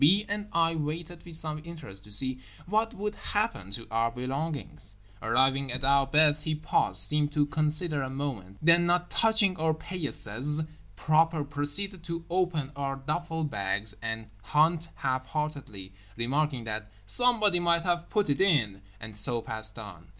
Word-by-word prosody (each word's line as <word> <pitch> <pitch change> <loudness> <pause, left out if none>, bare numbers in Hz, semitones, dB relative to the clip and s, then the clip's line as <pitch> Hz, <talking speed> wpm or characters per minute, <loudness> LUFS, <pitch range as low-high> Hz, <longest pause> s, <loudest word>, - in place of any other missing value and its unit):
B. 195 +9 +5
and 205 0 -3
I 165 0 +2
waited 165 +2 -5
with 170 -2 -9
some 155 -1 -3
interest 155 - -9
to 105 - -15
see 130 +5 -2 0.3
what 220 +4 0
would 210 +1 -3
happen 205 - -2
to 105 +4 -4
our 115 +1 +1
belongings. 130 -4 -5 0.3
Arriving 135 +3 +2
at 130 +1 -3
our 140 0 +4
beds 150 +1 +4
he 155 +1 -1
paused, 95 -10 +2
seemed 150 +7 +2
to 150 -1 +2
consider 155 +1 +1
a 130 - -3
moment, 130 -9 -5
then, 170 +1 +5
not 175 0 +1
touching 220 -4 +3
our 160 0 +1
paillasses 150 - +1 0.3
proper, 160 0 +2
proceeded 145 +7 0
to 170 0 -4
open 175 -6 0
our 140 -1 -2
duffle 160 +4 -3
bags 100 -2 0
and 110 0 -4 0.2
hunt 155 - +2
half 130 0 -2
heartedly, 140 -11 -5 0.2
remarking 135 +2 0
that 110 -1 -4
"somebody 215 - +3
might 170 -1 +2
have 175 -1 -1
put 210 -1 +1
it 145 +4 0
in;" 120 - +2 0.2
and 110 -1 -8
so 115 +3 +4
passed 110 0 -1
on. 95 -6 -9
150 Hz, 160 wpm, -28 LUFS, 120-170 Hz, 0.3 s, B